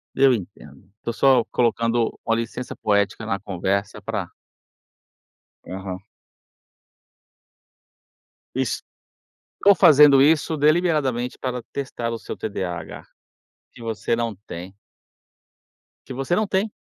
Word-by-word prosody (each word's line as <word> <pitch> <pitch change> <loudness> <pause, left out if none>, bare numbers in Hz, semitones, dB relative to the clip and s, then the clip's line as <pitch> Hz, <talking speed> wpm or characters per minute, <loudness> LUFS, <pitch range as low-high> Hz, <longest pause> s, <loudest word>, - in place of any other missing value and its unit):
Eu 135 -1 +5
entendo. 90 - -8
Tô 120 - -2
só 130 -1 +4
colocando 115 -1 0
uma 115 - +2
licença 115 +2 -4
poética 105 +1 0
na 100 -3 -1
conversa 100 +1 -2
pra - - -3 1.4
Aham. 95 0 -6 2.5
Es - - -1 0.8
tô 200 0 +7
fazendo 145 -4 +7
isso 155 +2 +3
deliberadamente 150 -6 +1
para 125 -2 -3
testar 125 -4 -3
o 115 - -4
seu - - -7
TDAH, 90 -5 -5 0.7
que - - -13
você 115 0 -1
não 115 -2 -2
tem. 95 -1 -9 1.3
Que 130 - -7
você 135 +7 -1
não 215 +1 +1
tem. 200 +3 0
115 Hz, 105 wpm, -23 LUFS, 100-135 Hz, 2.5 s, tô